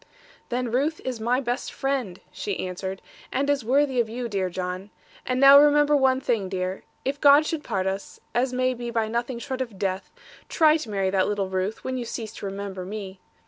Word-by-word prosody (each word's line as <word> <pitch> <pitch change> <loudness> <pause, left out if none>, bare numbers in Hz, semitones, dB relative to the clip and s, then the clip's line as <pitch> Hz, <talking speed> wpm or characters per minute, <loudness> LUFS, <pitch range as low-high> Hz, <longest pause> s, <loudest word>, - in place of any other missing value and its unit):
'Then 245 -1 -2
Ruth 290 +6 0
is 255 -3 -3
my 240 +3 +1
best 245 -2 -3
friend,' 265 -10 -2
she 200 -2 -3
answered, 190 +1 -5 0.3
'and 275 +2 0
is 280 -3 0
worthy 265 +2 +2
of 230 -2 +1
you, 240 +2 -4
dear 195 -4 -1
John. 185 +2 -4 0.4
And 255 0 0
now 275 +1 +10
remember 295 0 +5
one 265 -2 +3
thing, 225 -7 -1
dear; 185 0 -3 0.2
if 280 +2 -2
God 290 +1 +7
should 310 -1 -3
part 195 -5 -2
us, 195 +1 -4
as 250 +2 +1
may 255 0 +1
be 240 -1 -5
by 225 -2 0
nothing 235 +2 -2
short 260 +1 -4
of 230 -6 -5
death, 190 0 -2 0.4
try 310 -2 +5
to 270 -8 -7
marry 195 -2 0
that 190 -1 +2
little 200 -2 -1
Ruth, 190 +3 -2
when 260 0 -2
you 240 - -4
cease 225 -2 -5
to 200 - -5
remember 195 -1 -5
me. 195 -1 -7
235 Hz, 205 wpm, -25 LUFS, 195-265 Hz, 0.4 s, now